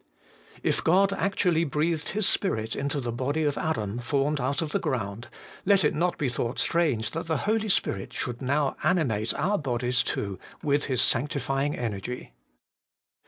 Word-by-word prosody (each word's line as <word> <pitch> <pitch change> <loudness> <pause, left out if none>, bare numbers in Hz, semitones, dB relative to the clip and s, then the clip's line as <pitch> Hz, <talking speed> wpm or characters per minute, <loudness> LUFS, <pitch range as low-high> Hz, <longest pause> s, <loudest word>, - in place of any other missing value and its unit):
4. - - -19
If - - +1
God 195 +4 +4
actually 190 -4 +1
breathed 155 +1 0
His 210 0 +1
Spirit 110 - 0
into 140 +1 -1
the 120 -3 -3
body 140 +6 -1
of 145 -2 +1
Adam 110 -8 -2
formed 140 +3 0
out 135 +3 0
of 160 -2 -2
the 200 - +1
ground, 120 - -3 0.4
let 195 -1 +4
it 150 - +3
not 175 +3 0
be 140 - 0
thought 120 +1 -2
strange 150 -10 +1
that 165 +1 -4
the 160 -2 +1
Holy 215 +1 +1
Spirit 95 - 0
should 120 0 -4
now 140 +2 +1
animate 135 - +2
our 205 +2 +1
bodies 125 -3 0
too 100 -3 -3 0.2
with 145 -1 +2
His 130 -3 +2
sanctifying 135 +1 +1
energy. 115 - -4
140 Hz, 165 wpm, -27 LUFS, 120-165 Hz, 0.4 s, God